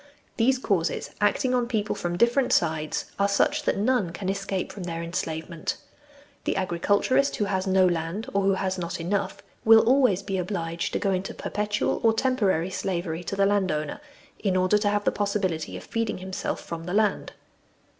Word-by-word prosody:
These 255 Hz, +3 st, +3 dB
causes, 195 Hz, -9 st, -1 dB
acting 210 Hz, +5 st, +2 dB
on 245 Hz, -1 st, +1 dB
people 215 Hz, -4 st, -1 dB
from 175 Hz, 0 st, -3 dB
different 240 Hz, +5 st, +3 dB
sides, 160 Hz, -2 st, 0 dB
are 200 Hz, -, +4 dB
such 290 Hz, +9 st, +2 dB
that -, -, +1 dB
none 210 Hz, -4 st, +1 dB
can 185 Hz, +2 st, -4 dB
escape 195 Hz, -1 st, -2 dB
from 200 Hz, -, -8 dB
their 165 Hz, -1 st, -4 dB
enslavement. 165 Hz, -1 st, -3 dB, 0.7 s
The -, -, 0 dB
agriculturist 200 Hz, +9 st, +1 dB
who 210 Hz, -, 0 dB
has 190 Hz, -1 st, -1 dB
no 190 Hz, 0 st, +4 dB
land, 175 Hz, +6 st, -1 dB
or 200 Hz, -, +2 dB
who 195 Hz, 0 st, +3 dB
has 190 Hz, -1 st, -2 dB
not 170 Hz, -1 st, -4 dB
enough, 195 Hz, +4 st, -2 dB, 0.2 s
will 220 Hz, 0 st, +8 dB
always 250 Hz, -7 st, +4 dB
be 195 Hz, -2 st, -2 dB
obliged 170 Hz, -3 st, -3 dB
to -, -, 0 dB
go 195 Hz, -, +1 dB
into 185 Hz, +1 st, -2 dB
perpetual 210 Hz, 0 st, -1 dB
or 225 Hz, -1 st, +5 dB
temporary 205 Hz, -8 st, +1 dB
slavery 175 Hz, -3 st, -3 dB
to 195 Hz, -, -3 dB
the 200 Hz, 0 st, +3 dB
landowner, 185 Hz, -7 st, 0 dB, 0.4 s
in 190 Hz, -3 st, +1 dB
order 185 Hz, +3 st, +3 dB
to 205 Hz, -1 st, +1 dB
have 205 Hz, 0 st, 0 dB
the -, -, +2 dB
possibility 195 Hz, -6 st, -1 dB
of -, -, -9 dB
feeding 230 Hz, -1 st, -2 dB
himself 185 Hz, 0 st, -4 dB
from 165 Hz, 0 st, -7 dB
the 180 Hz, +2 st, -3 dB
land. 210 Hz, -2 st, +1 dB
195 Hz, 180 wpm, -26 LUFS, 175-210 Hz, 0.7 s, will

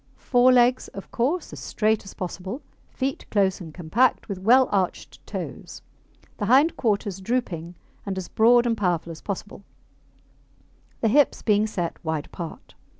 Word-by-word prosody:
Fore 250 Hz, 0 st, +4 dB
legs, 250 Hz, 0 st, +4 dB
of 195 Hz, -, -9 dB
course, 290 Hz, +10 st, -1 dB
as -, -, -7 dB
straight 215 Hz, 0 st, 0 dB
as 195 Hz, -, -11 dB
possible. 190 Hz, -, -6 dB, 0.3 s
Feet 270 Hz, +1 st, -3 dB
close 195 Hz, -2 st, +1 dB
and 165 Hz, -3 st, -8 dB
compact, 180 Hz, +11 st, +1 dB
with 200 Hz, -4 st, -5 dB
well 250 Hz, +6 st, +5 dB
arched 190 Hz, -3 st, -2 dB
toes. -, -, -7 dB, 0.6 s
The 205 Hz, -, -1 dB
hind 280 Hz, +7 st, +5 dB
quarters 200 Hz, -4 st, -1 dB
drooping, 180 Hz, -7 st, -2 dB, 0.3 s
and 195 Hz, -2 st, -4 dB
as 185 Hz, -2 st, -4 dB
broad 240 Hz, +2 st, +4 dB
and 235 Hz, -1 st, +1 dB
powerful 175 Hz, -5 st, -1 dB
as 160 Hz, -, -10 dB
possible, 200 Hz, 0 st, -6 dB, 1.4 s
the 225 Hz, -, +3 dB
hips 280 Hz, +6 st, +3 dB
being 210 Hz, 0 st, +3 dB
set 175 Hz, -6 st, -4 dB
wide 160 Hz, -2 st, -2 dB
apart. 170 Hz, -3 st, -9 dB
205 Hz, 150 wpm, -24 LUFS, 180-245 Hz, 1.4 s, well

